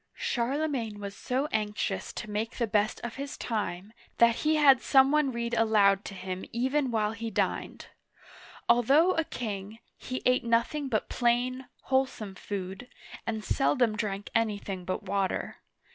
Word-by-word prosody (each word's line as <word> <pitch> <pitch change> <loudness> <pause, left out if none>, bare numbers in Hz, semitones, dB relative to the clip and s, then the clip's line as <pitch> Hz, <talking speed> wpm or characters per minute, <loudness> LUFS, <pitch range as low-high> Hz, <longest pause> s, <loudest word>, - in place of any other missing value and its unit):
'* - - -51
Charlemagne 245 -3 -1
was 200 0 -6
so 260 +6 -1
anxious 210 -2 -2
to 235 - -6
make 215 +3 -3
the 235 - +1
best 210 0 +1
of 235 +1 -5
his 280 +1 -5
time, 210 -3 -3 0.2
that 235 -1 +5
he 310 +1 +2
had 275 -4 +6
some 270 0 +5
one 300 -3 +3
read 235 -1 -3
aloud 210 -3 +4
to 195 - -7
him 185 0 -5
even 260 +3 0
while 215 -2 +1
he 225 +1 -5
dined. 205 - -2 0.8
Although 270 +9 +5
a 325 - +1
king, 210 -6 -5 0.2
he 255 0 -5
ate 250 0 +3
nothing 235 +5 +1
but 220 -5 -1
plain, 250 +2 0 0.2
wholesome 260 -6 0
food, 190 +3 -6 0.4
and 220 -1 -2
seldom 250 -5 +2
drank 205 -2 -3
anything 205 -5 -1
but 185 +3 -3
water. 195 -1 -2
230 Hz, 155 wpm, -29 LUFS, 205-255 Hz, 0.8 s, had